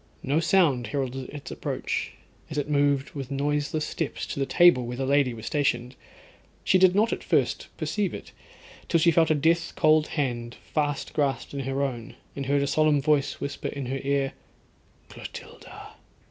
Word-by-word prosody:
No 145 +4 +1
sound 165 -8 +3
heralded 135 -2 -3
its 140 -2 -8
approach, - - -3 0.4
as 155 - -6
it 145 - -1
moved 145 -1 +1
with 135 -3 -6
noiseless 145 +2 -1
steps 95 - -3
to 110 - -5
the 135 - 0
table 175 -9 +5
where 125 0 -5
the 135 - -1
lady 140 -1 +3
was 115 -1 -8
stationed. 125 -2 0 0.7
She 185 - +4
did 185 0 +5
not 220 +3 +3
at - - -5
first - - 0
perceive 205 -4 -1
it, - - -9 0.6
till 165 - +3
she 170 +1 +5
felt 165 -1 +3
a 155 - +4
death 165 +3 +1
cold 155 0 +4
hand 120 -4 -2
fast 145 -2 -3
grasped 140 -4 -1
in 140 - -4
her 135 +1 -1
own, 120 -5 -4 0.2
and 140 -1 -4
heard 140 0 +2
a - - +1
solemn 155 0 +3
voice 145 0 +1
whisper 140 0 -4
in 140 -2 -5
her 135 +2 -3
ear, 140 -1 0 0.7
'Clotilda.' - - -10
140 Hz, 175 wpm, -26 LUFS, 135-155 Hz, 0.7 s, table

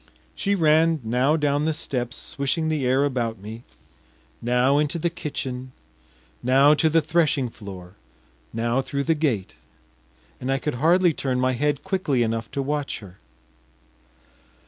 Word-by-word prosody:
She 200 0 0
ran 160 -1 +4
now 125 +7 +2
down 145 -1 +1
the 160 -1 0
steps, 125 -4 -3
swishing 150 +4 -2
the 150 -5 0
air 130 +2 +3
about 120 -5 -1
me, 110 +4 -9 0.8
now 125 +4 +3
into 150 +3 0
the 170 +1 -1
kitchen, 130 -6 -5 0.7
now 135 +4 +5
to 160 +1 +3
the 165 +1 +3
threshing 150 -5 +1
floor, 95 -5 -10 0.6
now 115 +3 0
through 140 +1 -3
the 165 - +2
gate, 135 - -1 0.8
and 130 +1 -2
I 135 - +2
could 150 +3 -2
hardly 175 +2 +4
turn 130 -3 -1
my 130 0 +2
head 145 +3 0
quickly 180 -10 0
enough 115 0 -2
to 140 - -3
watch 145 0 -2
her. 95 -3 -13
140 Hz, 145 wpm, -24 LUFS, 125-155 Hz, 0.8 s, now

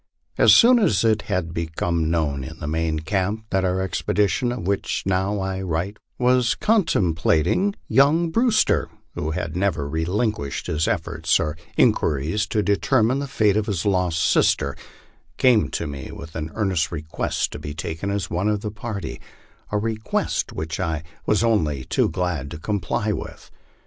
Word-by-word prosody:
As - - +6
soon 245 +1 +7
as 135 - +2
it 110 -1 +3
had 85 -2 -1
become 85 0 -1
known 75 -5 0
in 80 +4 -8
the 75 - -7
main 80 0 -1
camp 100 +6 -1
that 95 - +2
the 95 - +1
expedition 100 +6 0
of 120 -7 -5
which 100 +1 -1
I - - -1
now 95 0 -1
write 95 +3 -2 0.2
was 125 -1 +3
con 215 -3 +2
templated, 90 - +1
young 150 +7 +3
Brewster, 230 +1 +2 0.2
who 75 - -3
had 80 -1 -3
never 90 -7 0
relinquished 80 - -2
his 80 0 0
efforts - - 0
or 75 0 -2 0.2
inqui - - +4
ries 80 +10 -1
to 105 - 0
determine 120 +4 +2
the 140 - -3
fate 105 -6 +2
of 105 -1 0
his 100 -4 -2
lost 90 -4 +1
sister, - - +2 0.6
came 120 -5 +4
to - - -3
me 70 -3 -6
with 80 0 -10
an 80 0 -3
earnest 95 -7 0
re 80 -3 -4
quest 80 - -2
to - - -7
be 75 0 -6
taken 80 +4 -4
as 100 -2 -1
one 90 +4 -1
of 105 -1 0
the 105 - -4
party 105 -5 -6 0.5
a 105 - +1
request 110 +1 -1
which 80 +1 -4
I 80 -4 -2 0.2
was 105 +2 +3
only 80 - +1
too - - +1
glad 85 -7 -2
to 80 - -7
comply 100 +3 -1
with. - - -7
95 Hz, 170 wpm, -23 LUFS, 80-110 Hz, 0.6 s, soon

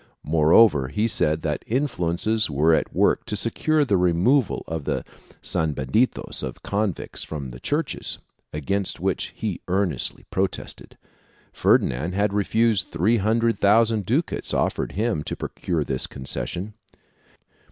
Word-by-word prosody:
Moreover 80 - +5
he 105 - 0
said 80 -7 +1
that 75 -2 -2
influences 110 - 0
were 75 +3 +3
at - - +1
work - - +2
to 105 - -3
secure 145 +8 +1
the 100 -7 +2
removal 90 +9 +2
of 80 -3 -4
the - - -2 0.4
sanbenitos 80 - 0
of - - -6
convicts 100 -3 -2
from 70 -5 -6
the - - -10
churches, 145 - -2 0.3
against 95 +6 -2
which - - 0
he 105 -6 -3
earn 95 0 +1
estly 65 - -6
protested; 95 0 -3 0.6
Ferdinand 75 +9 +2
had 100 0 +1
refused 110 +1 +2
three 100 +9 +2
hundred 115 +3 +1
thousand 110 0 +3
ducats 145 +9 -1
offered - - 0
to - - -13
him 105 -6 0
to - - -4
procure 85 -4 -2
this 65 -2 -2
concession. 70 - -4
95 Hz, 135 wpm, -24 LUFS, 80-110 Hz, 0.6 s, Moreover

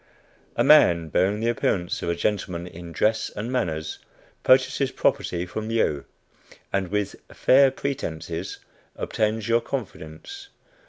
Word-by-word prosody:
A - - +2
man, 85 -2 +6
bearing 100 +6 +1
the 115 - +1
appearance 90 -6 -1
of - - -2
a 85 - +1
gentleman 90 -2 -2
in 85 -1 -9
dress 110 +6 +1
and 115 +4 -4
manners, 80 -11 -2 0.4
purchases 130 +1 +3
property 85 0 0
from 110 +4 -5
you, 75 -11 0 0.7
and 95 -1 0
with 105 +2 -2 0.2
"fair 135 +1 +5
pretences" 90 - -4 0.4
obtains 110 -1 -1
your 115 0 +3
confidence. 130 - -7
105 Hz, 125 wpm, -24 LUFS, 85-120 Hz, 0.7 s, man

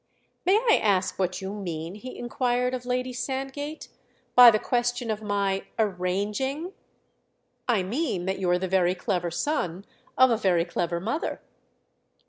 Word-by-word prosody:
"May 380 - +6
I 450 0 +4
ask 195 -3 +1
what 185 +1 -1
you 190 +1 -4
mean," 170 -4 -5
he 250 +5 -9
inquired 245 +1 0
of 250 -1 -5
Lady 250 0 -1
Sandgate, 270 +4 -4 0.5
"by 245 -1 +10
the 215 - +4
question 245 0 -1
of 215 0 -3
my 200 -2 -1
'arranging'?" 210 - -1 1.0
"I 215 -6 +3
mean 225 - -2
that 190 0 -2
you're 180 -2 +2
the 185 +1 -2
very 180 -1 +2
clever 175 -1 -1
son 180 - -2 0.3
of 260 -1 +6
a 230 - +3
very 180 -6 +2
clever 170 -1 -2
mother." 230 - -2
210 Hz, 145 wpm, -26 LUFS, 185-250 Hz, 1.0 s, by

